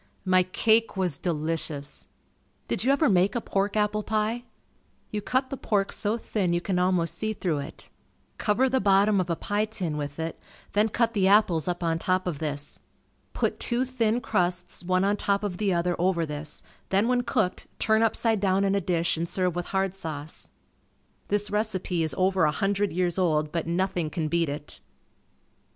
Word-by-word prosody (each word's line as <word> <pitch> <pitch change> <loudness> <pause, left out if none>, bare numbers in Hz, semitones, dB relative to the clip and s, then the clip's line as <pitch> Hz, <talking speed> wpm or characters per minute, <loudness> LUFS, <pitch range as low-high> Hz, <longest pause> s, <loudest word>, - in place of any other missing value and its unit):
My 185 0 +5
cake 220 +4 +2
was 180 -6 0
delicious. 155 -3 -3 0.6
Did - - -1
you 260 - +3
ever 290 +2 +3
make 190 -1 +3
a - - +2
pork 200 -1 -1
apple 210 0 +1
pie? 220 +3 -1 0.7
You 210 - -2
cut 260 +5 0
the 275 - -3
pork 200 -5 0
so 215 +2 0
thin 195 -6 -1
you 175 - +2
can 180 0 -1
almost 180 -2 +1
see 220 0 -1
through 170 -8 -1
it. 140 - -9 0.5
Cover 230 +5 +2
the 260 0 +1
bottom 200 0 +4
of 180 - -5
a 170 - +1
pie 205 +5 -1
tin 185 -8 -4
with 145 +1 -5
it, 165 0 -4 0.3
then 210 +2 +3
cut 230 +1 +1
the 195 -4 +2
apples 190 -6 +4
up 175 0 -2
on 165 -1 0
top 185 +2 0
of 170 -6 -3
this. 145 -2 -4 0.5
Put - - -1
two 245 +2 +1
thin 245 -2 0
crusts 180 -4 0
one 185 +1 +1
on 205 +1 +2
top 200 0 0
of 190 -4 -3
the 205 -1 +1
other 175 0 +1
over 175 -2 +1
this, 150 0 -5 0.3
then 195 +4 +2
when 250 0 +2
cooked, 235 -6 -1
turn 220 0 +3
upside 225 -1 +2
down 195 0 +2
in 195 0 +2
a 200 - +1
dish 170 -1 0
and 170 +1 -2
serve 180 -2 0
with 175 0 -3
hard 190 -1 0
sauce. 160 -5 -7 0.8
This 205 0 0
recipe 200 -5 0
is 155 -4 0
over 185 -2 +3
a 150 - +3
hundred 200 +4 0
years 180 0 0
old 155 -4 +1
but 165 -1 -2
nothing 175 -2 0
can 155 0 -2
beat 170 -2 +1
it. 145 +1 -7
185 Hz, 190 wpm, -26 LUFS, 170-210 Hz, 0.8 s, My